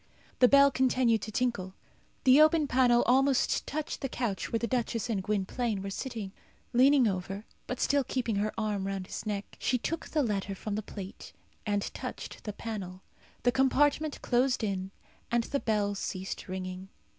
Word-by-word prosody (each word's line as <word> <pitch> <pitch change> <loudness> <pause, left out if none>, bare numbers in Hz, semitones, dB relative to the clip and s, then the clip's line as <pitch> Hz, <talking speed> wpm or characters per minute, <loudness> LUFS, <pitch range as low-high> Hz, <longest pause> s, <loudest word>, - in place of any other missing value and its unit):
The 250 - +8
bell 280 +1 +6
continued 255 -4 +2
to 215 - -5
tinkle. 205 -6 -1 0.5
The 265 +3 +7
open 310 0 +5
panel 245 -2 +4
almost 265 +1 +2
touched 305 +1 -4
the 270 - -2
couch 220 -8 -2
where 230 - +2
the 235 - -1
duchess 235 -2 -1
and 200 -4 0
Gwynplaine 210 +1 -1
were 195 - -4
sitting. 220 -4 -5 0.4
Leaning 260 0 +5
over, 195 +2 -3 0.2
but 250 - -4
still 280 0 +2
keeping 240 -4 -1
her 210 +1 0
arm 210 -3 -1
round 195 -1 -3
his 210 - -6
neck, 205 -1 -4
she 250 - +1
took 325 +6 -3
the 300 -2 +1
letter 200 -4 -2
from 210 +2 -5
the 215 - -1
plate, 195 -2 -9 0.3
and 205 -1 +1
touched - - -7
the 210 - -4
panel. 195 -5 -6 0.4
The 245 - +4
compartment 290 +3 +2
closed 250 0 +2
in, 190 -2 -2 0.4
and 235 0 +2
the 280 +4 -2
bell 210 -4 0
ceased 190 -1 -5
ringing. 185 0 -5
225 Hz, 170 wpm, -30 LUFS, 200-260 Hz, 0.5 s, The